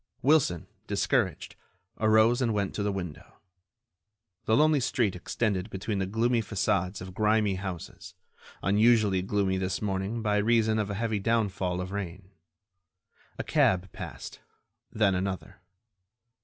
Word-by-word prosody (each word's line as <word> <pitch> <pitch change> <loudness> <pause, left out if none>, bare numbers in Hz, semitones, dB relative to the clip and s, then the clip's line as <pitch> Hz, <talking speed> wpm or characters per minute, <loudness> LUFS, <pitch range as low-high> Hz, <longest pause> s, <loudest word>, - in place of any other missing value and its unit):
Wilson, 135 - +3 0.2
discouraged, - - 0 0.4
arose 110 +3 +4
and 115 -4 +1
went 100 -2 -1
to - - -3
the 100 0 0
window. 90 -5 -7 1.1
The 110 - +3
lonely 155 0 +4
street 120 -6 0
extended 100 +1 -2
between 100 +1 -3
the 95 - -1
gloomy 115 +4 +1
façades 90 -3 -1
of 90 0 -8
grimy 105 0 +2
houses, 95 -3 -7 0.5
unusually 105 -1 +3
gloomy 95 0 0
this 95 0 -2
morning 100 +3 -2
by 105 -1 +1
reason 110 0 +2
of 105 -1 -1
a 100 - -3
heavy 110 0 -1
downfall 95 -4 0
of 90 +1 -5
rain. 95 -1 -6 1.1
A - - -3
cab 95 0 +2
passed; - - -8 0.5
then 105 -3 +2
another. 95 0 -4
100 Hz, 130 wpm, -28 LUFS, 95-110 Hz, 1.1 s, arose